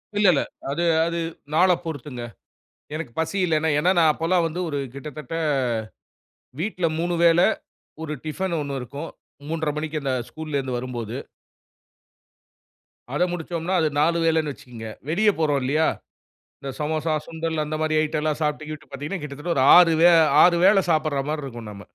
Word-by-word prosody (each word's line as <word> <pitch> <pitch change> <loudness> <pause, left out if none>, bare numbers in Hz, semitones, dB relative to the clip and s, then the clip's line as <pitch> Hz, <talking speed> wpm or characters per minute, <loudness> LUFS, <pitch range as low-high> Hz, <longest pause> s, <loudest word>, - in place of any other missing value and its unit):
இல்ல, 205 -1 +4
இல்ல. 140 - +2 0.3
அது 165 +5 -1 0.2
அது 170 0 -2 0.4
நாள 185 +3 +5 0.2
பொறுத்துங்க. 140 -5 -6 0.7
எனக்கு 155 -6 -5
பசி 160 +5 -1
இல்ல. 165 -3 +1 0.2
ஏனா, 180 +4 +3
நான் 160 -2 +6
அப்போலாம் 170 +3 +1
வந்து 165 +3 -5
1 145 - -2 0.2
கிட்டத்தட்ட 150 +3 -7 1.3
வீட்ல 185 -3 -1
3 175 +1 0
வேள, 165 0 +5 0.6
1 155 -1 -4
டிஃபன் 170 +3 -2
1 140 -2 -3
இருக்கும். 140 +6 -7 0.4
3:30 160 -2 -1
மணிக்கு 155 0 -3
அந்த 135 -1 -1 0.2
ஸ்கூல்லருந்து 140 -5 -3
வரும்போது. 120 -2 -5 2.0
அத 175 - +2
முடிச்சோம்னா. 170 +1 -3
அது 155 - +2
4 170 +2 +3
வேலைனு 160 -2 +2
வச்சிகங்க. 115 -4 -10 0.2
வெளிய 210 +6 +3
போறோம் 150 -3 +2
இல்லையா. 155 +5 +2 0.7
இந்த 140 - -6
சமோசா, 155 +1 -1
சுண்டல் 160 -1 -2
அந்த 155 +1 -3
மாரி 155 0 +1
ஐட்டம் 155 0 -1
எல்லாம் 155 -1 -1
சாப்ட்டு 150 0 -2
கிட்டு 155 -1 -7
பார்த்தீங்கன்னா 145 +7 -5
கிட்டத்தட்ட 150 +4 -3
ஒரு 130 - +4
6 170 -2 +7
வேள 175 -1 +7 0.2
6 175 -1 +5
வேள 195 -1 +6
சாப்ட்ற 155 -4 +1
மாரி 155 -2 -2
இருக்கும் 120 -4 -8
நாம. 100 -1 -10
155 Hz, 155 wpm, -24 LUFS, 145-165 Hz, 2.0 s, 6